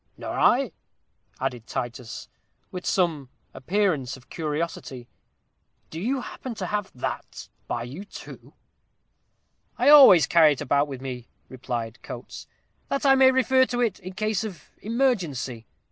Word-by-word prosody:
"Nor - - -6
I," - - +3 0.7
added 120 -3 -3
Titus, 120 -1 -5 0.4
with 180 -1 -6
some 160 -8 0 0.2
appearance 165 -5 -1
of 130 - -21
curiosity; 150 -5 -4 0.8
"do 160 - -6
you 255 +5 -1
happen 245 -1 -7
to - - -4
have 205 -2 -3
that 125 - -6 0.2
by 115 - -3
you 135 +11 -8
too?" - - -12 1.2
"I - - +4
always 270 - +9
carry 160 -3 +5
it 140 - -8
about 145 +1 +2
with 135 -3 -7
me," 125 -3 -6 0.2
replied 120 -2 -5
Coates, - - -9 0.4
"that 275 +1 -1
I 270 - +7
may 265 -1 +6
refer 260 0 +3
to 245 - -3
it 225 -5 0
in 185 -1 -9
case 215 +1 -1
of 195 -8 -9
emergency. 180 - -1
170 Hz, 140 wpm, -25 LUFS, -, 1.2 s, always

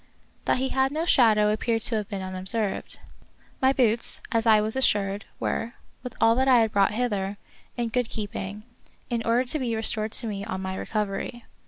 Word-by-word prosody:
That - - +2
he 265 +1 -1
had 265 0 +1
no 315 +3 -1
shadow 215 -8 +4
appeared 225 +1 -1
to 235 - +2
have 210 -2 -4
been 195 -2 -4
unobserved. 190 +3 -2 0.6
My 265 0 +5
boots, 235 -4 +2
as 230 -1 +1
I 215 -1 +7
was 215 +2 -2
assured, 205 -6 +1
were, 230 +2 -2 0.3
with 250 -2 -8
all 225 - +5
that 265 +1 +2
I 250 -3 +6
had 220 -1 +1
brought 200 0 +3
hither, 205 -4 -1 0.4
in 235 -1 -1
good 245 0 -1
keeping, 205 -1 -5 0.5
in 235 -1 0
order 235 +2 +2
to 300 +5 0
be 240 -4 -1
restored 220 -1 0
to 240 - -1
me 200 -3 -4
on 205 -3 -4
my 190 0 -4
recovery. 210 +3 -3
225 Hz, 190 wpm, -26 LUFS, 205-245 Hz, 0.6 s, I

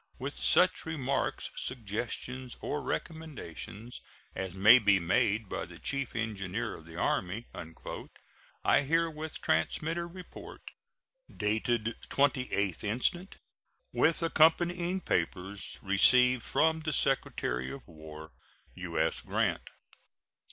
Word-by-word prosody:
with 140 +3 -5
such 185 +1 +4
remarks, 140 -4 -1
suggestions, 120 +2 -4
or 150 - -3
recommendations 125 - -6 0.3
as 95 -1 -4
may 110 +6 +8
be 100 -4 +4
made 105 +4 +1
by - - -3
the 85 -1 -10
Chief 140 +4 -2
Engineer 105 -3 -3
of 80 - -13
the 80 - -11
Army," 95 +6 -1 1.2
I - - +5
herewith 160 +1 -1
transmit 165 +2 0
a 170 - -3
report, 180 +1 -11 0.7
dated 110 +2 0
28th 125 - +1
instant, 130 - 0 0.6
with 165 +1 +2
accompanying 175 +3 +3
papers, 95 - -2
received 125 +6 +5
from 160 +5 +2
the 155 -1 -2
Secretary 65 - 0
of 140 - -9
War. 80 -1 -11 0.4
U.S. - - -1
GRANT. - - -1
120 Hz, 105 wpm, -31 LUFS, 100-155 Hz, 1.2 s, may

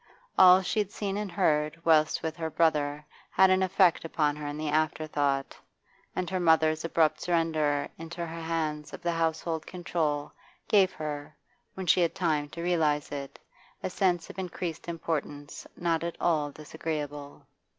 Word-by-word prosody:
All 185 0 +8
she 180 +4 -1
had 205 -2 0
seen 200 -1 -3
and 205 -2 -3
heard 155 -4 +1
whilst 155 -2 +3
with 160 -1 -2
her 160 -1 -3
brother 150 -2 +1 0.2
had 190 0 +5
an 185 0 +3
effect 185 -2 +3
upon 150 -2 0
her 150 -1 -6
in 145 +1 -4
the 155 0 -2
afterthought, 145 -3 0 0.6
and 185 - -1
her 185 0 -1
mother's 160 -2 +3
abrupt 165 -2 +2
surrender 155 -4 +1
into 165 +1 -7
her 165 0 -7
hands 155 -2 -3
of - - -9
the 170 - +1
household 165 -1 -1
control 160 -5 -2 0.4
gave 195 -3 +4
her, 150 -2 -6 0.4
when 190 - -5
she 180 - +4
had 170 - +1
time 155 -5 0
to 170 +3 -7
realise 155 -4 +1
it, 140 -1 -6 0.5
a - - -2
sense 180 -3 +1
of - - -10
increased 175 -3 -5
importance 150 -3 -4
not 165 -2 0
at 170 0 -4
all 155 -4 +1
disagreeable. 145 -1 -6
160 Hz, 160 wpm, -28 LUFS, 150-175 Hz, 0.6 s, All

